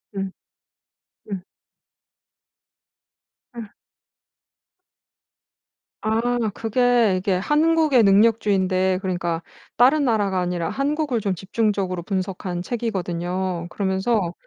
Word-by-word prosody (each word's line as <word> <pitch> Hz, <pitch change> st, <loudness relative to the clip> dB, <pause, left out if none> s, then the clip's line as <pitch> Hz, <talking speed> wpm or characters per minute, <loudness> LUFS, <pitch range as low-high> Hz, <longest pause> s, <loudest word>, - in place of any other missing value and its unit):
음. 195 Hz, -1 st, -3 dB, 1.0 s
음. 190 Hz, -2 st, -4 dB, 2.1 s
아. 230 Hz, -3 st, -9 dB, 2.3 s
아 220 Hz, +1 st, 0 dB, 0.3 s
그게 235 Hz, -2 st, +2 dB
이게 190 Hz, +1 st, 0 dB
한국의 300 Hz, -, +3 dB
능력주의인데 195 Hz, -3 st, +3 dB
그러니까 175 Hz, -3 st, -2 dB, 0.4 s
다른 280 Hz, +5 st, +5 dB
나라가 205 Hz, -6 st, +1 dB
아니라 175 Hz, -2 st, -2 dB
한국을 290 Hz, -2 st, -1 dB
좀 195 Hz, -2 st, 0 dB
집중적으로 190 Hz, -2 st, -1 dB
분석한 185 Hz, -2 st, -3 dB
책이거든요. 185 Hz, -5 st, -3 dB
그러면서 190 Hz, 0 st, 0 dB
195 Hz, 205 characters per minute, -22 LUFS, 185-230 Hz, 2.3 s, 다른